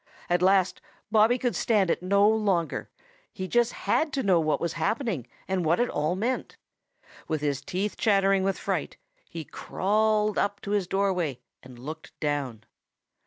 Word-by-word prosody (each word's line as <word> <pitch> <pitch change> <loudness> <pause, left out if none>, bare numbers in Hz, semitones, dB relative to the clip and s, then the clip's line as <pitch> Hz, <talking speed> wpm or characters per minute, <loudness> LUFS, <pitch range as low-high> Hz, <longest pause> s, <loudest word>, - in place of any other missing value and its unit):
At 175 0 +3
last 190 0 +3 0.3
Bobby 220 +3 +5
could 245 -1 -1
stand 205 -6 +2
it - - -1
no 200 +3 +4
longer. 205 -6 0 0.4
He 185 -1 -5
just 240 +3 +2
had 310 -1 0
to 270 - 0
know 185 -4 +4
what 155 -1 +1
was 170 -1 -2
happening, 185 - -1 0.2
and 190 -2 0
what 165 +2 +2
it 240 - +2
all 155 +4 0
meant. 235 +7 -2 0.7
With 155 -2 -1
his 145 -2 -1
teeth 195 +3 -3
chattering 195 -2 +3
with 195 0 0
fright, - - -3 0.3
he 165 - -6
crawled 215 +4 +1
up 200 0 0
to 200 - -5
his 205 -3 +1
doorway 180 -8 0 0.2
and 125 -1 -13
looked 155 +6 -9
down. 140 -7 -2
190 Hz, 165 wpm, -27 LUFS, 165-210 Hz, 0.7 s, Bobby